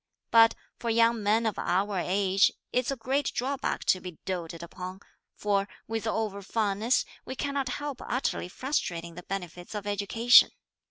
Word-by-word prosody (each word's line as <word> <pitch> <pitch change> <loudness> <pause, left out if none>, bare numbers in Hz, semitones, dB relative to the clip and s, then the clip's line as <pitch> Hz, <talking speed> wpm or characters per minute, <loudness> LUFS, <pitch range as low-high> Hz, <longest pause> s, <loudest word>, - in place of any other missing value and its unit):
But 230 0 +7 0.2
for 235 - -2
young 230 0 +3
men 215 +3 +2
of 220 - -1
our 195 +2 0
age 195 +2 +3 0.2
it's 250 -1 +1
a 275 - 0
great 270 +4 0
drawback 275 +2 -1
to 185 - +3
be 180 -4 -8
doated 170 -3 -4
upon, 185 +3 -7 0.3
for 200 -1 0 0.2
with 225 0 -3
over 215 -2 -1
fondness, 215 +3 +1 0.2
we 260 - -6
cannot 280 -1 -2
help 290 -3 -5
utterly 255 -7 -1
frustrating 180 - -2
the 180 - -8
benefits 180 0 -6
of 205 -1 -4
education. 205 +4 +5
210 Hz, 155 wpm, -28 LUFS, 185-235 Hz, 0.3 s, But